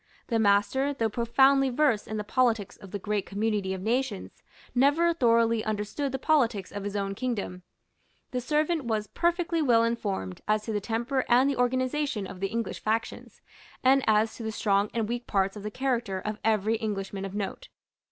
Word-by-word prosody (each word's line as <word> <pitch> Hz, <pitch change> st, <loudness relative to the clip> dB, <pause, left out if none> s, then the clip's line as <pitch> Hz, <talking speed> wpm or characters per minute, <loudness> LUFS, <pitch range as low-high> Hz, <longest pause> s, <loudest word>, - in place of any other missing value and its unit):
The 230 Hz, -2 st, +1 dB
master, 220 Hz, +7 st, +2 dB
though 225 Hz, -4 st, 0 dB
profoundly 265 Hz, +4 st, +4 dB
versed 255 Hz, -4 st, +1 dB
in 215 Hz, -, -4 dB
the 210 Hz, -, -2 dB
politics 225 Hz, -2 st, +1 dB
of 195 Hz, -, -13 dB
the 205 Hz, -, -4 dB
great 205 Hz, 0 st, -2 dB
community 205 Hz, -1 st, -1 dB
of 190 Hz, -1 st, -4 dB
nations, 235 Hz, -2 st, -2 dB, 0.3 s
never 290 Hz, +7 st, +3 dB
thoroughly 230 Hz, -6 st, +3 dB
understood 215 Hz, +6 st, -2 dB
the 265 Hz, -, -2 dB
politics 245 Hz, -, +1 dB
of 205 Hz, -1 st, -5 dB
his 205 Hz, 0 st, -4 dB
own 195 Hz, -1 st, -1 dB
kingdom. 205 Hz, -5 st, -3 dB, 0.7 s
The 250 Hz, -, -2 dB
servant 305 Hz, +2 st, 0 dB
was 220 Hz, -2 st, -1 dB
perfectly 340 Hz, -, 0 dB
well 235 Hz, -6 st, +4 dB
informed 205 Hz, -, -2 dB
as 215 Hz, 0 st, +2 dB
to 220 Hz, -, -4 dB
the 210 Hz, -, -1 dB
temper 240 Hz, +5 st, -1 dB
and 250 Hz, +2 st, +5 dB
the 280 Hz, -, +1 dB
organization 255 Hz, -2 st, 0 dB
of 190 Hz, -1 st, -9 dB
the 195 Hz, -, 0 dB
English 230 Hz, +2 st, -3 dB
factions, 225 Hz, +1 st, -3 dB, 0.4 s
and 265 Hz, +1 st, +5 dB
as 220 Hz, +1 st, +3 dB
to -, -, -8 dB
the 220 Hz, -1 st, -3 dB
strong 205 Hz, -1 st, +1 dB
and 225 Hz, -2 st, -1 dB
weak 240 Hz, +1 st, -4 dB
parts 195 Hz, -1 st, +1 dB
of 210 Hz, -, -7 dB
the 210 Hz, -, -4 dB
character 235 Hz, -5 st, -1 dB
of 210 Hz, +2 st, -5 dB
every 220 Hz, 0 st, +2 dB
Englishman 200 Hz, -3 st, -4 dB
of 195 Hz, 0 st, -6 dB
note. 210 Hz, -, -4 dB
225 Hz, 185 wpm, -27 LUFS, 205-260 Hz, 0.7 s, and